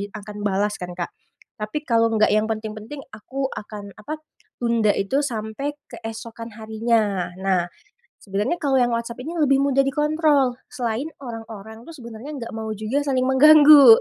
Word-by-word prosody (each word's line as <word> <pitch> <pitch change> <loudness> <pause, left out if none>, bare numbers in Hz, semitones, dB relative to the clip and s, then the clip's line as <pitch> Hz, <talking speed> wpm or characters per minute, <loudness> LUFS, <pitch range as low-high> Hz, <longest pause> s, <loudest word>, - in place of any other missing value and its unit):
bi 200 - -3
akan 210 0 -9
balas 205 0 0
kan, 180 - -5
Kak. 175 - -4 0.5
Tapi 255 +9 -3
kalau 230 -1 +4
nggak 215 -1 +4
yang 215 0 +3
penting-penting 220 +5 -5
aku 265 +5 -4
akan 205 -1 -8
apa, 305 +9 -5 0.4
tunda 230 -3 +3
itu 200 +8 +1
sampai 255 +2 -3 0.2
keesokan 225 -1 -8
harinya, 220 -3 0
nah. 185 -2 0 0.5
Sebenarnya 210 - -2
kalau 280 -3 0
yang 240 - +2
WhatsApp 235 +1 -3
ini 310 - -5
lebih 275 -3 +3
mudah 275 -1 +3
dikontrol, 295 -3 +2
selain 240 +2 -3 0.2
orang-orang 225 -2 -9
tuh 330 - -10
sebenarnya 235 +2 -9
nggak 240 -5 -6
mau 220 0 -5
juga 215 +6 -1
saling 260 -2 +1
mengganggu. 285 -1 +9
230 Hz, 155 wpm, -23 LUFS, 215-275 Hz, 0.5 s, mengganggu